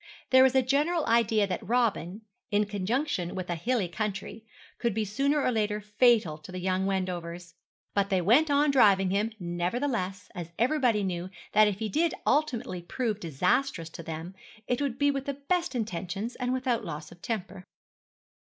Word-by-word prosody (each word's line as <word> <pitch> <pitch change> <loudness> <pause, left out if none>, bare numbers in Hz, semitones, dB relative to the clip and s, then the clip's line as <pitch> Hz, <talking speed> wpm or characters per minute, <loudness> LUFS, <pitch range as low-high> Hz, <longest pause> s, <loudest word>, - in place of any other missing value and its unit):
There 260 0 +8
was 265 0 +5
a 265 - +5
general 295 +6 +1
idea 225 -2 +3
that 190 - -3
Robin, 220 -4 0 0.3
in 210 0 +2
conjunction 205 - -2
with 185 -1 -4
a - - 0
hilly 220 +3 0
country, 210 +3 -5 0.4
might 235 -4 +1
be 220 -1 0
sooner 275 +8 +1
or - - +2
later 210 -2 0
fatal 210 -6 +3
to 155 - -11
the 185 - -6
young 185 +1 0
Wendovers; 175 -3 -3 0.4
but 200 -1 +1
they 190 - +2
went 240 - +4
on 285 +1 +3
driving 195 -8 +5
him, 210 +3 +1
nevertheless, 185 +3 -2
as 175 -3 -6
everybody 245 -4 +2
knew 180 -1 -3 0.2
that 215 0 +6
if 205 -2 -1
he 220 +1 -2
did 325 - +1
ultimately 265 - 0
prove 215 +3 -2
disastrous 170 - 0
to - - -8
them 165 +2 -6 0.3
it 245 +2 0
would 270 -4 -1
be 285 0 +3
with 275 -1 -3
the 280 - -2
best 340 +3 -1
intentions 205 0 -3
and 250 0 -2
without 255 -2 0
loss 150 +1 -6
of 170 - -15
temper. 200 -5 -4
210 Hz, 175 wpm, -28 LUFS, 185-255 Hz, 0.4 s, There